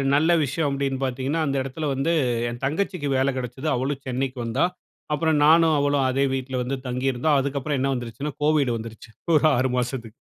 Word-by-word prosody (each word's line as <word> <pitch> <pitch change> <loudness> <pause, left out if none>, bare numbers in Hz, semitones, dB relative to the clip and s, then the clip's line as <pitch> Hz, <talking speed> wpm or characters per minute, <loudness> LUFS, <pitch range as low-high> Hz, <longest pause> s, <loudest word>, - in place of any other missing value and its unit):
நல்ல 155 +3 +3
விஷயம் 145 +2 -1
அப்டின்னு 135 -1 -1
பார்த்தீங்கன்னா, 135 +5 -1
அந்த 140 - -1
இடத்தில 145 +3 -4
வந்து, 135 +5 0 0.4
என் 120 +2 -7
தங்கச்சிக்கு 160 0 -1
வேல 135 +1 +2
கிடைச்சது. 130 +4 -5
அவளும் 135 +2 -2
சென்னைக்கு 130 +1 -2
வந்தா. 125 +8 +1 0.5
அப்பறம் 150 0 +2
நானும், 160 0 +5
அவளும் 145 -1 +2
அதே 135 +2 +1
வீட்ல 130 0 -4
வந்து 135 +2 -3
தங்கியிருந்தோம். 130 +3 +1
அதுக்கப்பறம் 140 +1 -2
என்ன 135 +1 +1
வந்துருச்சுனா, 125 +4 -4
கோவிட் 150 -4 +3
வந்துருச்சு. 110 0 -10 0.3
ஒரு 155 - +1
6 130 +1 +1
மாசத்துக்கு 120 -2 -4
135 Hz, 170 wpm, -24 LUFS, 125-145 Hz, 0.5 s, நானும்